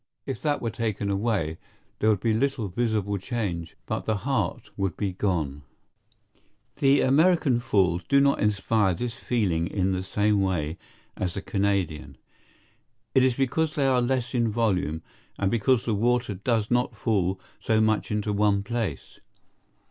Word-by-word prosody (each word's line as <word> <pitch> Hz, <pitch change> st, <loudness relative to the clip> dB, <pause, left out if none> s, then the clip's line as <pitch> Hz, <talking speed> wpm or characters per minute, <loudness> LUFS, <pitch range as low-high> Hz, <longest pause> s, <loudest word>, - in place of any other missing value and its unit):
If -, -, -5 dB
that 145 Hz, -4 st, 0 dB
were 115 Hz, -, -1 dB
taken 105 Hz, -3 st, -2 dB
away, 100 Hz, -6 st, -1 dB, 0.4 s
there 110 Hz, -, +3 dB
would 105 Hz, -3 st, +2 dB
be 115 Hz, -2 st, +2 dB
little 125 Hz, -2 st, 0 dB
visible 105 Hz, -1 st, -1 dB
change, 90 Hz, -7 st, -4 dB
but -, -, -3 dB
the 110 Hz, -, +1 dB
heart 115 Hz, -6 st, -2 dB
would 95 Hz, -4 st, -2 dB
be 100 Hz, -3 st, -2 dB
gone. 80 Hz, -8 st, -1 dB, 1.2 s
The 140 Hz, 0 st, +4 dB
American 145 Hz, -2 st, +3 dB
Falls 95 Hz, -6 st, +1 dB
do 140 Hz, -, +4 dB
not 140 Hz, 0 st, +3 dB
inspire 105 Hz, -2 st, +1 dB
this 120 Hz, +4 st, -3 dB
feeling 100 Hz, -11 st, 0 dB
in 95 Hz, 0 st, 0 dB
the 95 Hz, -1 st, -1 dB
same 105 Hz, +2 st, +1 dB
way 85 Hz, -4 st, -1 dB, 0.4 s
as 90 Hz, -2 st, -3 dB
the 100 Hz, -, -3 dB
Canadian. 90 Hz, -9 st, -1 dB, 1.0 s
It 130 Hz, -, +5 dB
is 130 Hz, -2 st, +3 dB
because 150 Hz, +4 st, 0 dB
they 140 Hz, -, +1 dB
are 130 Hz, -2 st, +3 dB
less 125 Hz, 0 st, -1 dB
in 120 Hz, -2 st, +2 dB
volume, 95 Hz, -8 st, 0 dB, 0.3 s
and 95 Hz, -1 st, 0 dB
because 120 Hz, +2 st, +2 dB
the 115 Hz, -, 0 dB
water 120 Hz, +1 st, +1 dB
does 105 Hz, +3 st, -1 dB
not 125 Hz, +1 st, +1 dB
fall 95 Hz, -5 st, 0 dB, 0.2 s
so 110 Hz, -1 st, +1 dB
much 110 Hz, -1 st, +1 dB
into 105 Hz, 0 st, -1 dB
one 100 Hz, -1 st, +2 dB
place. 115 Hz, -1 st, -4 dB
105 Hz, 155 wpm, -26 LUFS, 95-120 Hz, 1.2 s, It